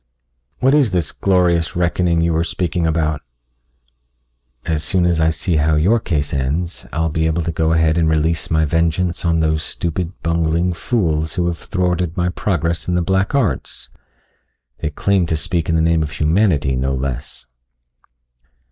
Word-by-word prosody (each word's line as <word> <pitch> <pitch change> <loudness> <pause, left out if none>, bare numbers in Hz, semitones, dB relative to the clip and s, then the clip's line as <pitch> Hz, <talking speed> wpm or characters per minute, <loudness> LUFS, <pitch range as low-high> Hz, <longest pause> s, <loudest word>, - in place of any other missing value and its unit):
"What 130 +2 +2
is 135 -9 +3
this 85 -5 0
glorious 90 -3 +1
reckoning 85 -1 +1
you 85 0 +1
were 80 +1 +1
speaking 85 0 -1
about?" 80 -2 0 1.4
"As 80 -2 -1
soon 90 -2 +2
as 85 -2 +1
I 80 - +4
see 80 +1 -1
how 75 +1 +2
your 95 +10 +3
case 75 -8 -2
ends, 75 +6 -2
I'll 80 0 0
be 80 +1 0
able 80 +1 0
to 85 - -2
go 80 0 0
ahead 80 0 +2
and 80 -1 +2
release 80 +1 0
my 80 -1 +2
vengeance 85 +3 0
on 85 -1 +2
those 80 -1 +1
stupid, 85 +2 -3
bungling 85 +2 +1
fools 80 -6 -1
who 90 -2 0
have 85 -1 -2
thwarted 90 -2 -1
my 90 0 +1
progress 85 -4 -2
in 90 - 0
the 90 - +1
black 95 +7 0
arts. 105 - -2 0.9
They 75 - -2
claim 95 +4 +1
to 80 - 0
speak 85 0 -2
in 80 - +2
the 80 - +2
name 80 0 +2
of 75 - -2
humanity, 75 -4 +1
no 65 +1 -1
less!" 65 -1 -5
85 Hz, 170 wpm, -19 LUFS, 80-90 Hz, 1.4 s, I